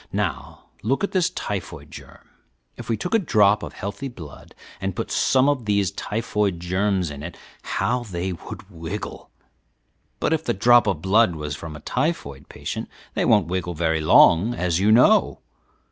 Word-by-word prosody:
Now - - -3 0.2
look 135 - 0
at 200 - -1
this 185 -3 +2
typhoid 100 -4 -6
germ. - - -13 0.5
If - - -10
we 115 - +1
took 180 - -4
a 225 - +5
drop 105 - +3
of - - -7
healthy 100 +7 -5
blood 80 - -12 0.3
and 95 -1 -3
put - - -4
some 130 +1 +3
of 140 -5 0
these 100 -2 +1
typhoid 105 -3 -2
germs 95 -1 0
in 70 -1 -8
it, 85 +3 -8 0.2
how 125 +1 -1
they 90 -2 -3
would 85 +2 -10
wiggle! 85 +4 -7 0.9
but - - +1
if 160 -1 -1
the - - -1
drop 120 +3 +5
of 100 - -1
blood 100 -1 +3
was 75 -1 -4
from 80 0 -8
a 75 - -10
typhoid 70 - -3
patient, - - -6 0.2
they - - 0
won't 105 -5 +4
wiggle 90 0 -3
very 80 0 0
long, 85 +8 +5
as 90 -3 0
you 105 +3 +3
know. 115 +3 +4
100 Hz, 175 wpm, -23 LUFS, 85-115 Hz, 0.9 s, a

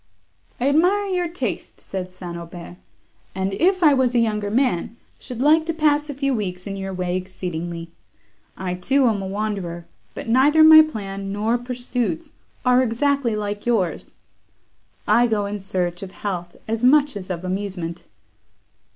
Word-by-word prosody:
"I 250 - +1
admire 360 +8 +3
your 360 -2 0
taste," 345 +2 -5
said 185 -1 -6
St. 180 -2 -8
Aubert, 170 +1 -9 0.6
"and, 190 +1 -1
if 370 - +2
I 300 -3 +7
was 255 -2 +2
a - - +5
younger 210 -3 0
man, 235 -2 0 0.2
should 250 0 -5
like 310 +2 +5
to 330 - -1
pass 300 -1 +2
a 285 - -4
few 275 0 0
weeks 185 -5 -3
in 200 -1 -4
your 195 0 -5
way 180 -1 -2
exceedingly. 175 -2 -5 0.7
I, 185 -1 -3
too, 260 +10 +2
am 215 -4 +2
a 190 - -4
wanderer, 195 -4 -3 0.3
but - - -7
neither 280 +7 +5
my 315 0 +10
plan 195 -9 -4
nor 215 +3 0
pursuits 245 -7 -3 0.3
are 250 0 +5
exactly 255 0 +1
like 205 +1 -4
yours—I 235 +3 -2
go 215 -3 0
in 205 +1 -4
search 180 -1 -2
of 190 -1 -8
health, 175 -4 -5
as 225 +1 -2
much 285 0 +4
as 195 -2 -7
of 180 0 -4
amusement." 185 -3 -4
210 Hz, 160 wpm, -22 LUFS, 185-265 Hz, 0.7 s, my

